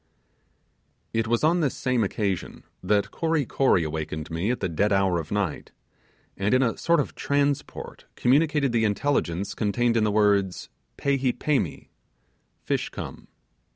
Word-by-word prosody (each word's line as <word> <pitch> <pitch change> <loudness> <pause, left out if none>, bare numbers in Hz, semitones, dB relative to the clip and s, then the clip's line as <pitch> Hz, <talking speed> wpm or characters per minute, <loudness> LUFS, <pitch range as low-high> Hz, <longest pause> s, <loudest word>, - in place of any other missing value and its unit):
It 115 0 0
was 120 +3 +1
on 170 +3 +4
this 145 -6 0
same 125 -3 +1
occasion 100 -2 -2 0.2
that 100 +2 +1
Kory 160 -3 0
Kory 125 -9 +2
awakened 80 0 -4
me 85 +6 -1
at 125 - 0
the - - -1
dead 100 +5 0
hour 95 -3 +2
of 80 - -7
night, 100 -7 -2 0.6
and 100 +6 +1
in 130 - +4
a 115 - 0
sort 170 -1 +2
of 145 - -2
transport 140 0 -2
communicated 145 +1 +2
the 115 -1 +1
intelligence 100 -5 0
contained 115 +2 +1
in 115 - +3
the 105 - +2
words 100 -3 +2 0.3
'pehee 135 -3 +1
perni' 135 - -1 0.7
(fish - - -1
come). - - -8
110 Hz, 150 wpm, -25 LUFS, 95-135 Hz, 0.7 s, on